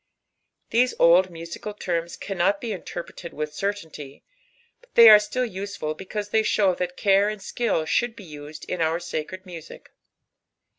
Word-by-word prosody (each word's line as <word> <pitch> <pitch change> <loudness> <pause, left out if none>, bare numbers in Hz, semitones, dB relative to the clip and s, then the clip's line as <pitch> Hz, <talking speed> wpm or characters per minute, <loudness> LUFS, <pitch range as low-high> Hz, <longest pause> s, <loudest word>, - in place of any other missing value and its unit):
These 245 +2 +2
old 175 +3 +5
musical 170 +5 -8
terms 170 -4 -3
canrnil 195 +1 0
be 235 - -5
inisrpr^ed 175 -3 -7
wUh 150 0 -3
certainty, 160 -7 -5 0.7
fyaithiyare 225 +2 +7
^lusrfid 195 -6 -5
because 205 +4 -5
they 220 +1 +3
shou> 200 -3 +2
that 180 0 -4
care 200 +1 +3
and 215 -1 -5
skill 200 -3 -1
akiiuld 230 +8 0
be 205 - -11
used 150 -2 -10
in 180 - -3
our 160 +1 +1
sacred 175 +2 -5
music. 170 -4 -11
185 Hz, 140 wpm, -24 LUFS, 165-210 Hz, 0.7 s, fyaithiyare